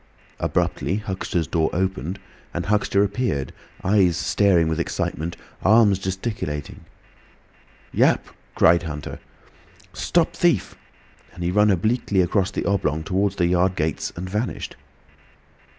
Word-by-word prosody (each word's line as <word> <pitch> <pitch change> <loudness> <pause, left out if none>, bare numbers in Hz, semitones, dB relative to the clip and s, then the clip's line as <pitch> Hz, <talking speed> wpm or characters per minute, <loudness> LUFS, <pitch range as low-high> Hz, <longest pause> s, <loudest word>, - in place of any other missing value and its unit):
Abruptly 95 - 0
Huxter's 95 -5 -2
door 80 -1 +1
opened 95 0 -2 0.4
and - - -2
Huxter 100 -1 +2
appeared, 100 - -1 0.3
eyes 95 -4 +3
staring 90 -3 +3
with 80 +1 -1
excitement, 85 0 -2 0.2
arms 105 -2 +5
gesticulating. 95 - -4 1.1
"Yap!" - - +3 0.3
cried 85 0 +5
Huxter. 75 -3 -6 0.7
"Stop - - +1
thief!" - - +2 0.6
and 90 - -6
he 85 - 0
ran 105 +2 +4
obliquely 100 +1 +1
across 95 +2 +1
the 100 - -4
oblong 80 -6 0
towards 100 +2 0
the 90 - +1
yard 90 +1 +2
gates, 80 -3 -1
and 90 +2 -5
vanished. 105 +6 -3
95 Hz, 120 wpm, -23 LUFS, 85-100 Hz, 1.1 s, arms